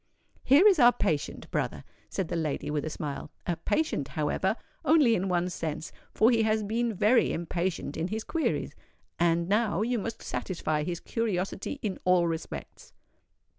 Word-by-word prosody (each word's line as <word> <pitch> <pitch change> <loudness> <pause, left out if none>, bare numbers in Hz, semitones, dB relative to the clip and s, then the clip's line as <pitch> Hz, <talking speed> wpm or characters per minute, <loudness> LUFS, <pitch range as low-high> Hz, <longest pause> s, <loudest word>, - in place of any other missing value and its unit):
"Here 285 +9 +6
is 385 -6 +5
our 240 -1 +8
patient, 155 -8 -2
brother," - - -2 0.3
said 190 - -2
the - - -3
lady, 150 -2 -2
with 150 -1 -1
a - - -2
smile: 150 -1 -5 0.2
"a 175 - 0
patient, 305 - -1
however, - - 0 0.3
only 300 -7 +5
in 195 -3 0
one 175 0 +1
sense, 160 -1 -4 0.2
for 225 +3 +4
he 230 -2 +3
has 220 0 +2
been 230 +3 0
very 215 +4 +3
impatient 170 -2 -2
in 165 +2 -1
his 215 +3 -3
queries; 330 +5 -1 0.5
and 170 0 +2
now 210 +1 +1
you 240 +1 0
must 225 +2 -5
satisfy 155 -4 -2
his 170 +2 -3
curiosity 200 +1 -2
in 200 -4 -2
all 180 -1 +4
respects." 165 -1 -6
190 Hz, 165 wpm, -28 LUFS, 165-230 Hz, 0.5 s, our